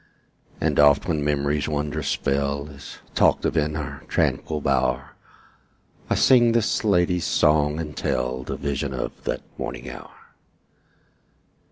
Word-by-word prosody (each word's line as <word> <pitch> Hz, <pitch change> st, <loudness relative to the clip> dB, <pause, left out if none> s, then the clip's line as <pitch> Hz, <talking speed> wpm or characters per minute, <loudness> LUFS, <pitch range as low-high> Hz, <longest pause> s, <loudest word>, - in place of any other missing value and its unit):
And 75 Hz, -2 st, 0 dB
oft 75 Hz, +4 st, +5 dB
when 80 Hz, -4 st, 0 dB
memory's 75 Hz, 0 st, 0 dB
wondrous 75 Hz, -1 st, -2 dB
spell 70 Hz, +1 st, -1 dB
Is 70 Hz, -1 st, -11 dB, 0.2 s
talked -, -, +3 dB
of -, -, 0 dB
in 75 Hz, -1 st, +1 dB
our 75 Hz, -3 st, -5 dB
tranquil 75 Hz, -1 st, 0 dB
bower, 65 Hz, -2 st, 0 dB, 1.0 s
I -, -, +2 dB
sing 120 Hz, -3 st, +5 dB
this 115 Hz, -1 st, +1 dB
lady's 90 Hz, -4 st, +2 dB
song, 75 Hz, 0 st, +2 dB
and 75 Hz, -3 st, -5 dB
tell 65 Hz, 0 st, -1 dB
The -, -, -5 dB
vision 70 Hz, -1 st, -3 dB
of 60 Hz, -, -5 dB
that -, -, -2 dB, 0.2 s
morning 60 Hz, -, -5 dB
hour. 65 Hz, -, -11 dB
75 Hz, 135 wpm, -24 LUFS, 70-80 Hz, 1.0 s, oft